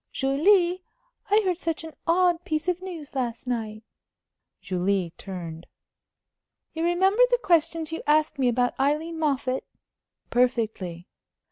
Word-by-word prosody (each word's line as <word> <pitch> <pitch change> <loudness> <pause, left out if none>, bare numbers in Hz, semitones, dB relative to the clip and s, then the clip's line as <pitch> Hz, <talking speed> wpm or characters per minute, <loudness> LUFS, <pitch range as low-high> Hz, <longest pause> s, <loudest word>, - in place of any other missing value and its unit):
"Julie, 345 +7 +3 0.5
I 425 +2 +4
heard 365 -2 0
such 330 -2 -2
an 320 -1 -8
odd 350 0 +3
piece 310 +2 -2
of 360 0 0
news 345 -6 -8
last 245 -4 -3
night." 220 -3 -3 0.8
Julie 185 -1 -1
turned. 170 -4 -8 1.1
"You 325 - -3
remember 380 +6 +3
the - - +3
questions 330 -3 +2
you 325 - -4
asked 300 -1 +2
me 260 - +3
about 245 0 +2
Aileen 305 +4 0
Moffatt?" 270 -4 0 0.7
"Perfectly." 220 -8 0
300 Hz, 125 wpm, -26 LUFS, 235-345 Hz, 1.1 s, I